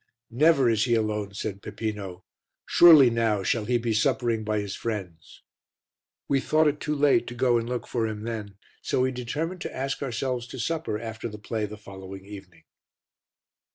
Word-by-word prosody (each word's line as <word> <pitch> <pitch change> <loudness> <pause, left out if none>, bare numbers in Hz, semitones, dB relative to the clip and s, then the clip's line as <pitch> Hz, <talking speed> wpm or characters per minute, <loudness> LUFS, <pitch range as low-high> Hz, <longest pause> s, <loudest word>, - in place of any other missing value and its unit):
"Never 140 +1 +4
is 115 0 +2
he 120 -2 +2
alone," 105 -2 -2
said 100 -1 -4
Peppino. 100 -4 -5 0.4
"Surely 155 -8 +8
now 110 -4 +1
shall 110 +3 0
he 120 +2 +2
be 115 -1 -1
suppering 115 +1 +1
by 105 0 -1
his 100 -1 -4
friends." 95 -8 -6 0.8
We 140 - +2
thought 155 +3 +2
it 150 0 0
too 150 -1 -2
late 145 +4 +3
to 120 - -6
go 120 -1 +3
and 115 +1 -5
look 125 -1 -3
for 115 -2 -1
him 105 -1 -5
then, 105 -4 -5 0.2
so - - 0
we 130 0 +2
determined 150 +9 -4
to - - -5
ask 135 +1 -3
ourselves 125 -1 -2
to - - -8
supper 160 -9 -2
after 115 0 -6
the 105 - -8
play 105 0 -3
the 105 +1 -9
following 95 -1 -10
evening. 95 -4 -12
115 Hz, 180 wpm, -26 LUFS, 105-130 Hz, 0.8 s, Surely